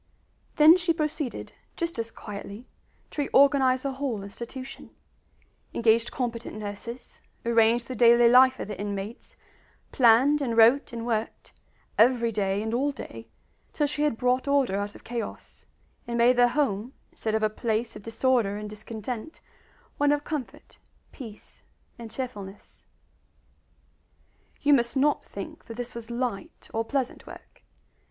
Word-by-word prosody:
Then 310 +3 +8
she 350 -2 +1
proceeded, 305 -4 -3 0.2
just 335 -7 -2
as 230 0 -2
quietly, 205 +2 -9 0.5
to 295 - -2
reorganize 270 -2 +4
the 275 - -1
whole 260 -6 -3
institution; 240 +6 -8 0.9
engaged 230 0 +3
competent 235 -3 -4
nurses, 215 +4 -8 0.2
arranged 235 0 +3
the 255 - -5
daily 235 0 +6
life 255 +2 +6
of - - -4
the 205 -3 -6
inmates, 205 +2 -6 0.5
planned 260 +5 +5
and 235 -4 -1
wrote 235 +6 +5
and 230 -1 -5
worked, 225 -2 -3 0.5
every 235 0 +4
day 200 -1 -1
and 220 +1 -3
all 275 +4 +1
day, 275 - -9 0.5
till 295 - +1
she 295 +1 -3
had 295 -6 +1
brought 250 +2 +1
order 280 -7 +2
out 205 0 -4
of - - -14
chaos, 235 -1 -7 0.4
and 235 0 -2
made 240 +2 +5
the 245 0 +5
home, 245 -3 -1 0.2
instead 220 -1 -2
of 220 - 0
a - - +5
place 225 +1 -2
of 210 - -9
disorder 225 -1 +1
and 210 0 -6
discontent, 220 - -7 0.6
one 290 0 +4
of 290 0 +1
comfort, 295 -6 -6 0.3
peace, 225 -6 -12 0.4
and 230 -1 -8
cheerfulness. 210 -6 -7 1.8
You 290 - +5
must 235 -1 +2
not 290 +2 +2
think - - -9
that 230 -1 -9
this 245 0 -5
was 235 -1 -8
light 235 -5 -4
or 225 - 0
pleasant 260 +2 -3
work. - - -13
235 Hz, 145 wpm, -26 LUFS, 220-265 Hz, 1.8 s, Then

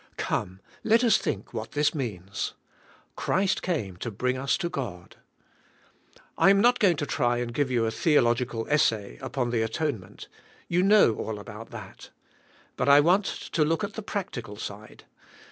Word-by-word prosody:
Come, 95 +1 -3 0.2
let 225 +2 +4
us 235 - +5
think 100 - -4
what 110 -1 -5
this 150 0 +2
means. 100 - -4 0.6
Christ 190 +1 0
came 110 - -2
to 120 - -4
bring 125 +4 -1
us 130 -1 0
to 175 -2 -2
God. 110 - -6 1.2
I - - +6
am 200 0 +5
not 245 +4 +4
going 180 -6 +4
to 145 - -1
try 120 -4 +1
and 120 -1 -3
give 145 +1 0
you 120 -3 +1
a 110 - 0
theolog 120 -4 +3
ical 115 -2 -5
essay 110 - +1
upon 125 -3 -2
the 115 -2 +1
atonement. 110 - -3 0.4
You 175 +1 +2
know 200 - +5
all 110 -1 -4
about 105 +2 -9
that. - - -10 0.7
But 125 - +1
I 140 +1 +8
want 180 +7 +4
to 160 - -1
look 165 +6 0
at 205 0 -3
the 220 - -5
practical 125 - -5
side. 105 0 -8
125 Hz, 170 wpm, -27 LUFS, 110-170 Hz, 1.2 s, I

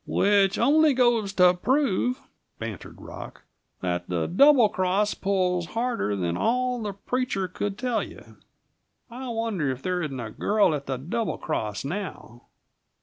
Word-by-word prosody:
"Which 200 -1 +3
only 305 0 +4
goes 240 -5 +2
to 180 -2 +6
prove," 250 +3 +1 0.4
bantered 110 -4 -7
Rock, - - -10 0.4
"that 90 -1 -2
the 85 -3 0
Double 270 +4 +6
Cross 200 +1 0
pulls 180 -3 0
harder 230 - -1
than 85 -3 -1
all 250 - 0
the 205 -2 -3
preacher 200 -1 -2
could 195 +3 -4
tell 245 -2 0
you. - - -11 0.7
I 255 +2 -6
wonder 225 - -1
if 130 0 -4
there 180 -1 -1
isn't 140 -5 -4
a 115 -3 -5
girl 205 - +2
at 140 -2 -4
the 135 -1 -2
Double 215 - -3
Cross, 105 +1 -3
now!" 160 - -6
195 Hz, 145 wpm, -25 LUFS, 145-235 Hz, 0.7 s, to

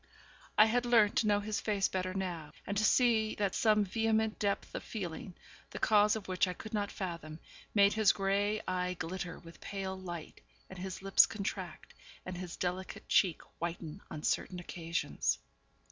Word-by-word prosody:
I 215 - +9
had 240 +2 +1
learnt 225 -2 +5
to 230 -4 +3
know 205 0 +3
his 215 +1 -2
face 205 -3 +1
better 185 0 -2
now; 175 -5 -4
and 200 - -3
to 210 - +2
see 220 -2 +4
that 200 -3 0
some 215 -2 +3
vehement 220 +1 +1
depth 200 -1 -1
of - - -3
feeling, 180 -3 -6 0.3
the - - -7
cause 210 0 +4
of 215 -3 -6
which 185 0 +2
I 180 - -2
could 220 +5 -10
not 205 -2 -1
fathom, 170 -5 -5 0.4
made 200 0 +6
his 215 -2 +5
grey 200 +2 +1
eye 180 0 -1
glitter 175 +1 -4
with 165 0 -14
pale 195 -1 -4
light, 175 -4 -7 0.3
and - - -8
his 190 +1 -6
lips 195 0 +6
contract, 195 -5 -5 0.3
and 185 - -5
his 180 -1 -6
delicate 185 +1 -3
cheek 180 -5 +3 0.2
whiten 170 +1 -4
on 150 - -7
certain 180 - 0
occasions. 170 -1 -1
195 Hz, 175 wpm, -33 LUFS, 180-215 Hz, 0.4 s, I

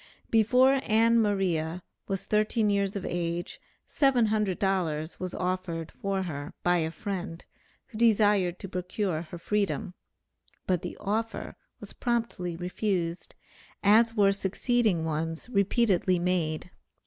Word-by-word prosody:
Before 255 +5 +4
Ann 230 +1 +4
Maria 180 -5 0 0.2
was 195 -1 -3
thirteen 215 0 +2
years 200 0 0
of 200 - -4
age 175 0 -3 0.3
$700 195 - +1
was 185 -1 -4
offered 180 -3 -3
for 195 -1 -2
her 145 -5 -6
by 175 0 +3
a 160 -1 0
friend, 180 -1 -5 0.4
who 220 - -8
desired 205 -5 +3
to - - -7
procure 180 -2 -2
her 175 +1 -9
freedom, 200 +1 -1 0.7
but 180 -2 +1
the - - -6
offer 225 +3 -3 0.2
was - - -9
promptly 230 -8 -2
refused, 180 -1 -2 0.5
as 225 +3 +5
were 200 -2 +5
succeeding 200 -2 +1
ones 160 +5 -3
repeatedly 200 -3 +2
made. 175 -2 -1
195 Hz, 120 wpm, -28 LUFS, 175-215 Hz, 0.7 s, as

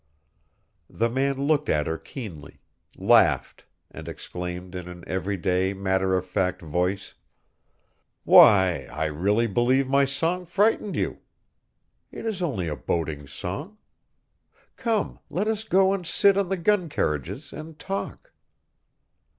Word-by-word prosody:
The 115 +1 -1
man 135 +2 0
looked 150 -1 +1
at 75 -1 +2
her 80 0 -3
keenly, 95 - -9 0.4
laughed, - - +3 0.2
and - - -10
exclaimed 90 +1 -7
in 90 -1 -6
an 90 -1 -10
every 95 +2 -2
day, 95 +1 0
matter 95 -1 +1
of 90 - -3
fact 90 0 -1
voice: 90 +5 -2 1.1
"Why, 95 -4 +6
I 80 +2 -2
really 100 +9 +1
believe 120 +5 +2
my 140 +1 +3
song 165 +7 -1
frightened 205 +3 +1
you. - - -2 0.9
It - - -8
is 215 -5 -3
only 115 - -1
a 75 - -2
boating 75 +1 -3
song. 95 - -6 1.0
Come, 225 -4 -1
let 200 +4 -1
us 220 -1 -1
go 195 -2 +3
and 195 -2 -3
sit 195 +3 +4
on 195 -2 0
the 195 - 0
gun 180 -1 +1
carriages 100 - -3
and 155 0 -9
talk." 195 - -6
105 Hz, 135 wpm, -25 LUFS, -, 1.1 s, Why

